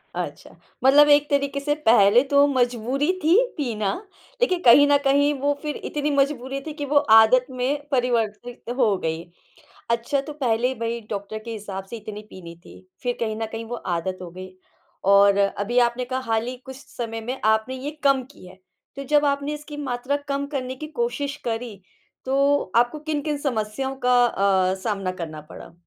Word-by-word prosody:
अच्छा। - - -6 0.3
मतलब 290 +3 +7
एक 290 0 +5
तरीक़े 280 0 0
से 295 +1 0
पहले 220 +2 +6
तो 280 0 +6
मजबूरी 255 +3 0
थी 330 +4 +4 0.2
पीना। 215 -8 -1 0.5
लेक़िन 370 -8 +2
कहीं 275 +5 +8
न 285 - +5
कहीं 285 +2 +3
वो 285 +1 +1
फ़िर 300 -1 -4
इतनी 295 0 -2
मजबूरी 275 -1 0
थी 305 - -5
कि 290 -2 -5
वो 290 +1 +1 0.2
आदत 250 +3 +4
में 280 +4 -2
परिवर्तित 240 -2 -1
हो 220 -7 +3
गई। 160 -1 -3 0.7
अच्छा 235 +4 0
तो 300 +2 -8
पहले 250 -3 0
भई 230 0 -3
डॉक्टर 205 +1 -4
के 235 - -7
हिसाब 200 -3 -6
से 235 - -5
इतनी 210 -1 -8
पीनी 170 -2 -10
थी - - -14 0.2
फ़िर 245 -1 -1
कहीं 220 -2 -2
न - - -1
कहीं 225 0 -5
वो 240 +1 -5 0.2
आदत 185 +2 -4
हो 175 - -8
गई। 185 +2 -9 0.6
और 200 0 +6
अभी 205 +4 0
आपने 240 +1 +2
कहा 260 +1 -3
हाल 225 +1 +1
ही 250 0 -5
कुछ 265 0 -8
समय 230 -4 -6
में 250 +4 -5
आपने 220 +3 +2
ये 265 +3 -5
कम 275 -2 +4
की 185 - -15
है 185 +1 -14 0.4
तो 275 - -6
जब 295 +2 +3
आपने 280 +1 -1
इसकी 295 0 -9
मात्रा 265 -1 -2
कम 280 0 -1
करने 260 -2 -3
की 305 - -7
कोशिश 285 -12 -2
करी 225 -3 -4 0.4
तो 275 -4 +1
आपको 240 +5 +2
किन-किन 300 -1 -2
समस्याओं 265 0 -3
का 245 -1 +5
अ, 190 -3 +1
सामना 195 -4 -2
करना 155 -2 -6
पड़ा? - - -11
250 Hz, 180 wpm, -23 LUFS, 220-280 Hz, 0.7 s, कहीं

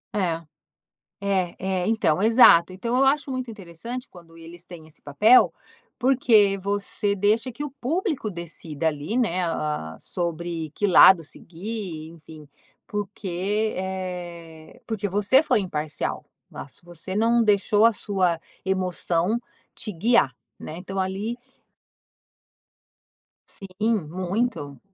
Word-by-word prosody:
É. 170 -5 0 0.8
É 190 -3 0 0.3
é, 180 - -2
Então, 200 -6 +1
exato! 215 -6 +6
Então 235 +6 -2
eu 270 - +4
acho 280 +1 +2
muito 255 -2 -4
interessante 225 +6 -7
quando 170 -2 -16
eles 170 +2 -12
têm 170 -3 -12
esse 155 - -11
papel, 210 - +5 0.5
porque 230 -6 +4
você 200 +1 -2
deixa 215 +6 +1
que 265 +5 -6
o 295 - -4
público 280 - -2
decida 165 -2 -4
ali, 150 +7 -3
né, 200 -8 +1
ah, 150 - -3
sobre 170 -2 -4
que 205 - 0
lado 180 -1 +8
seguir, 175 0 -7
enfim. 155 -2 -14 0.4
Porque, 205 +1 -2
eh, 175 -4 -6
porque 215 -3 -2
você 205 - +3
foi 295 - +2
imparcial 150 -5 -4 0.3
lá, - - -8
se 140 - -13
você 175 +2 -7
não 230 +2 +3
deixou 210 +1 +3
a 230 - +5
sua 185 -5 0 0.3
emoção 185 +1 0 0.4
te 220 - -5
guiar, 170 - +2 0.2
né, 155 - -7
então 190 +1 -5
ali 195 +6 -2 2.2
Sim, 195 -1 -1
muito. 180 - -2
190 Hz, 125 wpm, -24 LUFS, 170-220 Hz, 2.2 s, lado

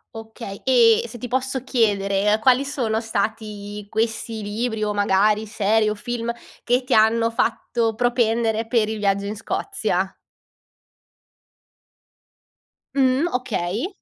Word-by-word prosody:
Okay. 220 -2 -8
E, 235 -4 +5
se 240 +1 -10
ti 245 - -6
posso 260 +1 -2
chiedere, 210 -4 +1
quali 255 +3 +4
sono 230 -6 -1
stati 210 -1 -4
questi 225 0 -2
libri, 220 +2 -2
o 210 0 0
magari 205 +2 +2
serie 215 +1 +1
o 210 - -2
film, 235 +2 -3 0.3
che 250 +2 +1
ti 250 - -1
hanno 230 +1 +4
fatto 230 0 0
propendere 230 -1 +1
per 225 -3 +2
il 220 - -3
viaggio 200 -1 +1
in 205 +1 -4
Scozia? 195 -2 -2 2.8
Mh, 265 +4 +3
okay. 235 - -2
220 Hz, 120 wpm, -22 LUFS, 210-240 Hz, 2.8 s, E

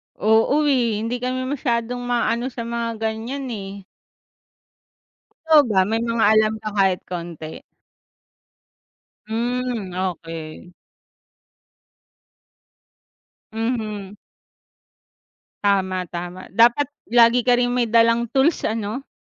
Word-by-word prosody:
Oo, 225 +8 +3
eh, 235 -6 +1
hindi 240 +2 -2
kami 255 +1 -2
masyadong 245 -3 -2
maano 240 0 0
sa 240 -2 -6
mga 230 0 -3 0.2
ganiyan, 255 +5 -5
eh. 195 -2 -7 1.6
Ikaw 310 -2 +7
ba, 195 -3 +3
may 225 +1 0
mga 230 -1 +1
alam 215 0 +3
ka 215 - -4
kahit 190 -2 +2
konti? 170 -3 -6 1.7
Hmm, 235 -2 -2
okey. 165 -2 -5 2.8
Mhm. 215 -3 -3 1.5
Tama, 190 -2 +1
tama. 175 +2 -7
Dapat 240 +6 +5 0.2
lagi 240 +1 +5
ka 245 0 +3
ring 245 0 +1
may 240 -2 0
dalang 230 0 +3
tools 275 +5 +2
ano? 220 +4 -4
230 Hz, 95 wpm, -22 LUFS, 200-245 Hz, 2.8 s, Ikaw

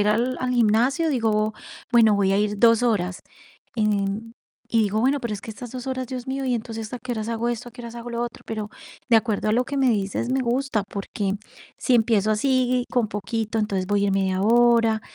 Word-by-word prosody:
ir 210 - +1
al 240 +4 +1
al 255 - -1
gimnasio, 245 +8 +3
digo: 215 -4 +1 0.4
"Bueno, 220 -3 +6
voy 195 -1 +2
a 195 - +3
ir 210 0 0
2 230 +1 +5
horas", 190 -6 0 0.6
em, 210 +1 -1 0.4
y 230 - +1
digo: 210 +1 0
"Bueno, 275 +4 +2
pero 235 -4 -3
es 200 - -7
que - - -7
estas 245 +2 -8
2 255 -1 -6
horas, 260 -1 -3
Dios 250 0 -6
mío, 270 +1 -3
y 250 - +1
entonces 225 -1 -5
¿a - - -5
qué 245 0 -5
horas 220 -1 -4
hago 230 +1 -1
esto? 240 +1 -5
¿A - - -16
qué 245 - -10
horas 235 0 -8
hago 240 0 -7
lo 235 0 -2
otro?" 240 -1 -6
Pero 215 -1 -4 0.4
de 230 - +7
acuerdo 220 -2 0
a - - +2
lo 245 +3 +2
que 280 +2 -5
me 265 -2 +3
dices, 205 +3 -1
me 265 +1 +1
gusta, 245 -2 0
porque 200 0 -3 0.4
si 255 - +2
empiezo 220 -2 +3
así 255 +1 +1
con 245 -3 +1
poquito, 220 +1 -3
entonces 195 -3 -1
voy 205 0 +1
a - - +2
ir - - +1
media 190 -1 0
hora, 230 0 +4
230 Hz, 230 wpm, -24 LUFS, 210-245 Hz, 0.6 s, de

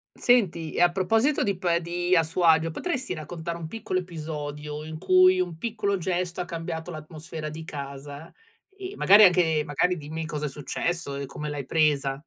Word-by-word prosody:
Senti, 185 -10 +2
e - - 0
a 175 0 +5
proposito 225 +10 +2
di 200 -3 -1
pe 175 -2 +1
di 175 +2 0
a 165 - +5
suo 165 +3 -3
agio, 165 0 +4
potresti 265 - -3
raccontare 170 +1 -6
un 165 -2 -6
piccolo 185 -1 -2
episodio, 150 -3 -6
in 155 0 -7
cui 185 +1 +5
un 175 -3 -2
piccolo 210 -1 -1
gesto 180 0 -2
ha - - -3
cambiato 165 0 -5
l'atmosfera 155 0 -7
di 160 +1 -7
casa? 140 +1 -8 0.4
Ehm, 390 0 -7
magari 205 +2 +7
anche 170 -4 +4
magari, 180 +6 +1
dimmi 160 +1 -5
cosa 150 -1 -4
è - - -2
successo 145 +1 -3
e 140 - -4
come 150 +2 -6
l'hai 145 -3 -4
presa. 140 -3 +1
165 Hz, 180 wpm, -26 LUFS, 150-180 Hz, 0.4 s, magari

